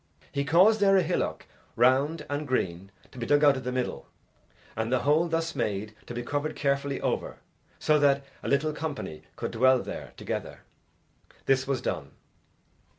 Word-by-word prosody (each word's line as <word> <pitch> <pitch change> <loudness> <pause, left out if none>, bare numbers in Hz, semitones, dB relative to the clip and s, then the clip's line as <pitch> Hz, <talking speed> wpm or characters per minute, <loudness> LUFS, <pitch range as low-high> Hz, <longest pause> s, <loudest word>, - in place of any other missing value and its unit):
He 140 - -1
caused 190 +8 +5
there 195 -1 +5
a 185 - +4
hillock, 175 +2 -2 0.3
round 140 +6 +3
and 145 +1 -3
green, 95 -7 -1 0.2
to 125 - -11
be 115 - -3
dug 145 +1 +4
out 145 -1 +6
of 130 - -5
the 125 - -2
middle, 125 -1 -3 0.7
and 110 +1 -2
the 130 - +2
hole 155 +4 +3
thus 165 0 -1
made 105 +1 -2
to 120 - -6
be 120 - -3
covered 145 +4 -2
carefully 140 -1 0
over, - - -2 0.4
so 155 0 +3
that 140 -1 +3 0.2
a - - -6
little 150 +2 +2
company 150 - -5
could - - -4
dwell 130 +2 +4
there - - -7
together. - - -5 0.8
This 135 -1 +2
was 135 -3 -1
done. - - -4
140 Hz, 170 wpm, -28 LUFS, 125-155 Hz, 0.8 s, out